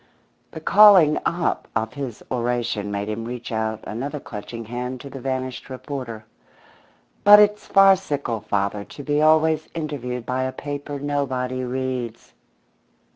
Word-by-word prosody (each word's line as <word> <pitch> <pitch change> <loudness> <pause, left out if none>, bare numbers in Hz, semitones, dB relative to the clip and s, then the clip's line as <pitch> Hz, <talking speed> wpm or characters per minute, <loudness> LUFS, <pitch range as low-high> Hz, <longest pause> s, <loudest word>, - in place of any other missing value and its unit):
The - - -8
calling 190 -4 +7
up 170 0 -1
of 110 -1 -1
his 135 -6 -6
oration 120 -4 -1
made 100 0 -3
him 110 +1 -3
reach 120 +1 -6
out 110 -1 -2
another 140 +7 -5
clutching 115 0 -8
hand 125 +3 -5
to 140 - -10
the 135 - -7
vanished 130 0 -4
reporter. 130 -4 -6 1.0
"But 205 0 +10
it's 210 0 +3
farcical, 190 - +3
father, 100 0 -1
to 145 - -11
be 145 +1 +1
always 155 0 +3
interviewed 125 -7 -4
by 130 +1 -1
a 130 - -2
paper 145 +1 -5
nobody 130 -3 -2
reads." 125 -2 -4
130 Hz, 135 wpm, -23 LUFS, 115-150 Hz, 1.0 s, But